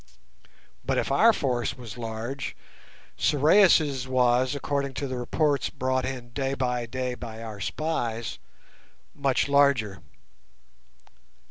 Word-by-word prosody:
But - - 0
if - - 0
our 230 - +6
force 125 - -1
was 115 -4 -9
large, 115 +3 -5 0.6
Sorais' 150 -4 +4
was, 130 +1 +2
according 140 -1 -2
to 140 - -3
the 130 -1 -4
reports 145 +2 0
brought 130 0 -1
in 130 -2 -5
day 135 +1 -2
by 125 -2 -1
day 125 +1 -3
by 115 -2 -8
our 110 -3 -7
spies, 115 - -3 0.7
much 140 -2 +1
larger. 140 -9 +3
130 Hz, 115 wpm, -26 LUFS, 120-140 Hz, 0.7 s, our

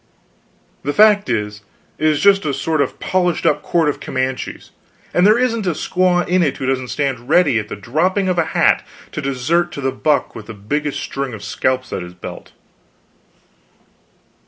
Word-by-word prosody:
The 145 - -2
fact 210 -4 +5
is, 105 -3 -2 0.4
it 155 - +2
is 150 -2 +2
just 200 -1 +5
a 140 -3 -1
sort 155 +2 0
of 140 - -2
polished 180 -2 0
up - - +2
court 165 -3 +1
of 145 - -1
Comanches, 130 0 -4 0.4
and 180 +3 +4
there 215 +2 +5
isn't 230 -5 0
a 175 - +2
squaw 180 0 +1
in 180 +1 +2
it 145 -5 0
who 130 - -4
doesn't 130 -1 -1
stand 130 -2 -3
ready 150 -8 +4
at 105 - -5
the - - -6
dropping 170 - 0
of 180 -2 +1
a 165 - +2
hat - - +4 0.3
to 155 - -4
desert 150 +6 0
to - - -6
the 135 0 0
buck 145 +2 0
with 110 - -10
the 110 - -8
biggest 145 +9 -2
string 135 -4 -4
of 100 - -10
scalps 130 +4 -1
at - - -2
his 90 0 -9
belt." 90 - -9
145 Hz, 185 wpm, -19 LUFS, 130-175 Hz, 0.4 s, fact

